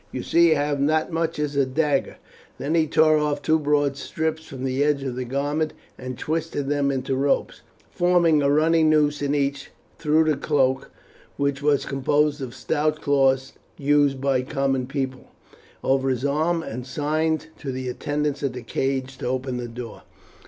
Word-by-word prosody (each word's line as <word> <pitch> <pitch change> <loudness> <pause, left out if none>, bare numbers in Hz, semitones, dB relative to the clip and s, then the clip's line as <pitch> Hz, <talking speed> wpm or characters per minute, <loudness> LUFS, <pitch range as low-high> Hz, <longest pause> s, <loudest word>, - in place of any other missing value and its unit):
"You 125 - -4
see 170 -1 +4
I 145 - +1
have 145 -1 -1
not 155 +3 +2
as - - -12
much 165 0 -1
as 150 -1 -2
a 140 - +4
dagger." 140 +1 0 0.4
Then 145 +4 -2
he 160 -2 +3
tore 155 0 +4
off 150 -1 0
two 160 0 +3
broad 145 -2 +1
strips 160 +2 -3
from 130 -1 -8
the 135 +1 0
edge 145 -2 +1
of 130 -3 -3
the 130 0 -3
garment 145 +4 -1 0.2
and 130 -1 -7
twisted 160 -3 -2
them 145 -1 +1
into 135 -1 -1
ropes, 140 +1 0 0.3
forming 175 -3 +3
a 140 - +2
running 160 +2 +4
noose 150 -1 +2
in 145 0 0
each, 140 -1 -1 0.3
threw 155 +1 +3
the 155 -3 +1
cloak, 135 -2 +1 0.5
which 140 0 0
was 145 -1 +2
composed 145 +2 +1
of 130 - -4
the - - -14
stout 155 +1 -1
cloth 135 -2 +2 0.3
used 145 -1 +2
by 135 -1 +1
the 125 - -4
common 135 -2 -1
people, 135 -2 -4 0.6
over 135 0 +2
his 130 +1 -1
arm, 160 +4 +1
and 125 0 -6
signed 155 +4 -1
to 135 - -4
the 130 0 -4
attendants 145 +2 -2
at 140 -3 -1
the 125 -1 -7
cage 130 +2 -2
to - - -3
open 130 0 -2
the 120 -1 -4
door. 115 -1 -8
145 Hz, 190 wpm, -24 LUFS, 135-155 Hz, 0.6 s, see